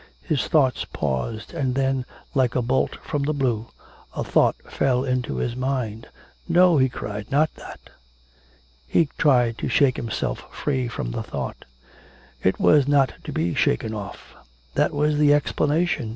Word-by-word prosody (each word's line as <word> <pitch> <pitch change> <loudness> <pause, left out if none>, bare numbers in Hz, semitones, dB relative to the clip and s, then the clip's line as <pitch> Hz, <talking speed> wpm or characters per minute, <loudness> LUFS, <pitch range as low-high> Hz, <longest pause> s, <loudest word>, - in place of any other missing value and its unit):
His 155 -5 -1
thoughts 135 -5 +2
paused, 75 - -3
and 135 -6 -1
then, 135 -1 0 0.3
like 130 -3 +1
a 125 - +1
bolt 130 +3 0
from 145 - -2
the 150 +2 0
blue, 120 -5 0 0.5
a - - -2
thought - - +3
fell 130 -2 +1
into 125 -2 -1
his 120 -1 -2
mind. 125 -4 -3 0.4
'No,' 175 -2 +5
he 130 0 +4
cried, 105 -3 -6
'not 150 +3 +2
that.' - - -12 1.0
He 160 - +2
tried 120 -6 +3
to - - -2
shake 130 +1 +3
himself 115 -2 -3
free 130 -4 -1
from 65 - -4
the - - -3
thought; - - -6 0.8
it 95 - +1
was 145 -3 +5
not 140 -2 +3
to - - -5
be 85 +1 -1
shaken 110 - +1
off. 100 -2 -8 0.4
That - - +2
was 150 +1 +1
the 145 -1 +6
explanation. 145 -2 0
130 Hz, 155 wpm, -23 LUFS, 115-145 Hz, 1.0 s, the